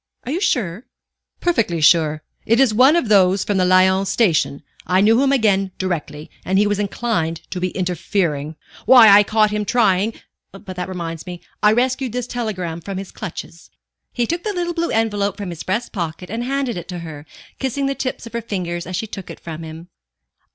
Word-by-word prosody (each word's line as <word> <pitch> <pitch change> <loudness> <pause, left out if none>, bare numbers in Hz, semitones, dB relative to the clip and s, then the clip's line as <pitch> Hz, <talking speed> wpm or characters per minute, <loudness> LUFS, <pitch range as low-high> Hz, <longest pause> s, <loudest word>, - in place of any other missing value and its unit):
Are 255 - -5
you 345 +5 -2
sure?" 215 - -1 0.5
"Perfectly 230 - +1
sure. 155 -1 +3 0.2
It 230 +2 +3
is 265 -5 +4
one 260 +8 +5
of 340 -9 +1
those 195 -2 +4
from 205 - -1
the 185 - +3
Lyons 190 +1 +4
Station. 165 -9 +1 0.2
I 185 +1 +3
knew 225 +5 +4
him 275 0 +3
again 200 -7 +2
directly, 160 -4 -4
and 190 +1 0
he 205 - +4
was 205 0 0
inclined 200 -6 -2
to 185 - -3
be 185 +1 -1
interfering. 175 -4 -2 0.3
Why, 240 -3 +9
I 200 +1 +8
caught 215 0 +2
him 210 0 -1
trying 215 -2 +2 0.4
but 195 -1 -10
that 180 +1 -4
reminds 170 -2 -6
me 175 -1 -6 0.2
I 210 - +5
rescued 255 +1 0
this 250 -1 -2
telegram 190 -9 -4
from 195 +3 -6
his 195 0 -7
clutches." 175 -3 -8 0.4
He 240 - 0
took 340 +7 -2
the 420 +1 -3
little 345 -2 -2
blue 335 0 -1
envelope 205 -3 0
from 200 -4 -5
his 170 - -7
breast 215 +6 -2
pocket 175 0 -5
and 230 +2 -3
handed 270 -5 -2
it 175 - -7
to 180 - -6
her, 150 -2 -9 0.3
kissing 270 +1 -1
the 275 - 0
tips 260 -2 -4
of 230 - -11
her 235 - -2
fingers 175 -6 -4
as 185 - -4
she 220 - -2
took 195 -3 -8
it - - -9
from 165 -1 -8
him. 160 +2 -9
200 Hz, 200 wpm, -20 LUFS, 175-235 Hz, 0.5 s, Why